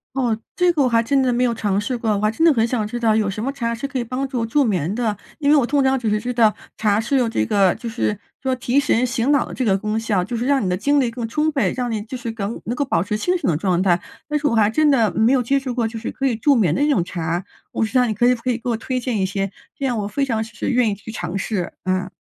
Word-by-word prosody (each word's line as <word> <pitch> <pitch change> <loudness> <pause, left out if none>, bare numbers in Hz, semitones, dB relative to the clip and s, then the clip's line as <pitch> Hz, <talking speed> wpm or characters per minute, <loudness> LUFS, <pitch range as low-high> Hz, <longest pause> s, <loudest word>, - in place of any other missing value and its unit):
哦， 245 -4 +1 0.2
这 360 -1 +3
个 310 - -1
我 - - +3
还 230 -1 +3
真 270 +4 +2
的 255 -1 +2
没 240 +1 +1
有 245 -2 +2
尝 205 -3 -1
试 245 +4 -3
过， 225 - -3
我 200 - 0
还 215 +1 +2
真 320 +9 +1
的 320 - +6
很 225 -3 +2
想 230 -2 -1
知 240 +3 -5
道 220 -2 +3
有 215 -2 +1
什 200 +2 -4
么 265 - -1
茶 235 -4 -2
是 260 +4 -4
可 275 -1 -3
以 240 - -1
帮 255 +4 -3
助 245 -4 -2
助 280 +6 +2
眠 185 - 0
的。 220 -3 -1 0.2
因 285 -1 +2
为 300 - +6
我 265 - +3
通 285 +2 +2
常 265 0 +2
只 235 -3 -2
是 210 0 +1
知 250 +2 -3
道， 225 -3 +3 0.2
茶 210 -1 +2
是 235 +5 0
有 250 -3 +2
这 110 - 0
个 195 - +3
就 235 +1 -7
是 225 -2 -1 0.2
说 260 -1 0
提 250 +1 0
神 255 -4 +2
醒 255 +2 +1
脑 285 - +3
的 - - -9
这 260 - -2
个 195 -4 +3
功 215 +2 -2
效， 215 -5 0
就 225 +6 -4
是 235 +2 -2
让 275 -4 +2
你 185 - 0
的 180 - +1
精 285 +9 +2
力 245 -3 +1
更 235 -1 -4
充 300 +7 0
沛， 285 -3 0
让 250 -1 -2
你， 220 -2 -2
就 225 +5 -7
是 240 -2 -5
更 220 0 -4
能 240 - -2
够 285 - 0
保 260 -11 +1
持 210 +3 -2
清 360 +11 +1
醒 340 - 0
的 150 - +1
状 180 0 +1
态， 175 -2 +3 0.3
但 300 0 0
是 295 - -2
我 280 - +2
还 215 -2 +4
真 305 +6 +3
的 230 -8 +3
没 225 +3 +3
有 265 -2 +3
接 275 +4 +1
触 260 -3 -4
过， 235 -2 0
就 225 0 -7
是 225 - -5
可 270 - 0
以 240 - -1
助 280 +6 +3
眠 200 - +2
的 260 - -1
那 295 - +3
种 275 -12 +3
茶， 170 +1 -3 0.3
不 - - -2
知 220 +4 +1
道 250 - +4
你 220 - -1
可 225 +4 0
以 250 - +3
不 230 - -17
可 255 - 0
以 235 - -3
给 245 - -6
我 235 - +1
推 255 +3 -3
荐 245 -4 -2
一 190 - +2
些， 195 0 -2 0.3
这 275 - -5
样 245 -4 0
我 205 - -2
非 275 +7 -1
常 225 -4 -1
是 225 - -4
愿 250 -3 +3
意 205 - 0
去 205 +3 -10
尝 175 -4 -4
试， 195 -2 -2
啊。 185 0 -1
230 Hz, 350 characters per minute, -21 LUFS, 210-260 Hz, 0.3 s, 的